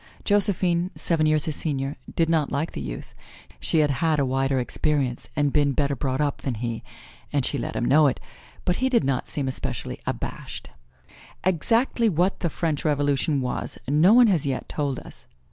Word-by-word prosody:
Josephine, 185 Hz, -4 st, +2 dB
seven 160 Hz, -2 st, +1 dB
years 155 Hz, -1 st, +3 dB
his 155 Hz, -, -2 dB
senior, 140 Hz, -2 st, -2 dB, 0.2 s
did 165 Hz, -2 st, +2 dB
not 160 Hz, -3 st, +1 dB
like 150 Hz, +4 st, -1 dB
the -, -, -6 dB
youth. -, -, -7 dB, 0.5 s
She 160 Hz, -, +2 dB
had 145 Hz, -1 st, +2 dB
had 155 Hz, +3 st, +1 dB
a 140 Hz, -, +2 dB
wider 135 Hz, +1 st, 0 dB
experience 130 Hz, 0 st, -1 dB
and 145 Hz, -1 st, +1 dB
been 145 Hz, -2 st, +3 dB
better 140 Hz, 0 st, 0 dB
brought 130 Hz, 0 st, -2 dB
up 145 Hz, -2 st, -1 dB
than 130 Hz, -4 st, -2 dB
he, 115 Hz, 0 st, -4 dB, 0.5 s
and 140 Hz, -3 st, +1 dB
she 140 Hz, -, -1 dB
let -, -, -4 dB
him 120 Hz, -, 0 dB
know 150 Hz, +3 st, +5 dB
it, 130 Hz, -, -1 dB, 0.5 s
but 180 Hz, -, +1 dB
he 260 Hz, +1 st, +1 dB
did 240 Hz, -, +3 dB
not 130 Hz, -2 st, -1 dB
seem 140 Hz, -3 st, -2 dB
especially 130 Hz, -, -4 dB
abashed. -, -, -5 dB, 0.7 s
Exactly 225 Hz, -, +2 dB
what 180 Hz, +2 st, +1 dB
the 170 Hz, -, 0 dB
French 155 Hz, -2 st, -2 dB
Revolution 145 Hz, -1 st, +1 dB
was, 125 Hz, -, -2 dB
no 155 Hz, +8 st, +5 dB
one 245 Hz, +2 st, +7 dB
has 185 Hz, -9 st, +2 dB
yet 135 Hz, -2 st, -2 dB
told 140 Hz, -3 st, -2 dB
us. -, -, -12 dB
150 Hz, 185 wpm, -24 LUFS, 135-170 Hz, 0.7 s, one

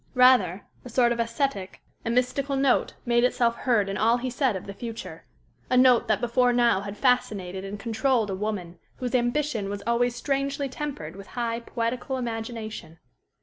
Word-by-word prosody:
Rather, 250 Hz, -8 st, +5 dB, 0.2 s
a 250 Hz, -, -9 dB
sort 240 Hz, 0 st, +3 dB
of 235 Hz, -, -1 dB
ascetic 230 Hz, -4 st, -2 dB, 0.2 s
and 230 Hz, +1 st, -1 dB
mystical 270 Hz, +3 st, 0 dB
note 270 Hz, -2 st, +2 dB
made 240 Hz, 0 st, +3 dB
itself 235 Hz, -2 st, +2 dB
heard 235 Hz, -6 st, +1 dB
in 195 Hz, 0 st, -3 dB
all 230 Hz, +2 st, +3 dB
he 255 Hz, +1 st, -3 dB
said 255 Hz, -3 st, +1 dB
of 185 Hz, -, -6 dB
the 200 Hz, -, -7 dB
future, 230 Hz, +2 st, -7 dB, 0.4 s
a 255 Hz, -, +3 dB
note 250 Hz, -2 st, +5 dB
that 215 Hz, -2 st, +2 dB
before 245 Hz, +1 st, +2 dB
now 240 Hz, -5 st, +3 dB
had 200 Hz, +1 st, -7 dB
fascinated 200 Hz, -8 st, 0 dB
and 200 Hz, +1 st, -6 dB
controlled 230 Hz, 0 st, +1 dB
a -, -, -2 dB
woman 185 Hz, -4 st, -4 dB, 0.2 s
whose 250 Hz, -1 st, -4 dB
ambition 240 Hz, -3 st, 0 dB
was 200 Hz, 0 st, -5 dB
always 240 Hz, +1 st, +1 dB
strangely 275 Hz, +2 st, -1 dB
tempered 265 Hz, -, -6 dB
with 195 Hz, 0 st, -10 dB
high, 230 Hz, -1 st, -1 dB
poetical 240 Hz, +3 st, -3 dB
imagination. 225 Hz, -7 st, -5 dB
235 Hz, 175 wpm, -26 LUFS, 210-255 Hz, 0.4 s, Rather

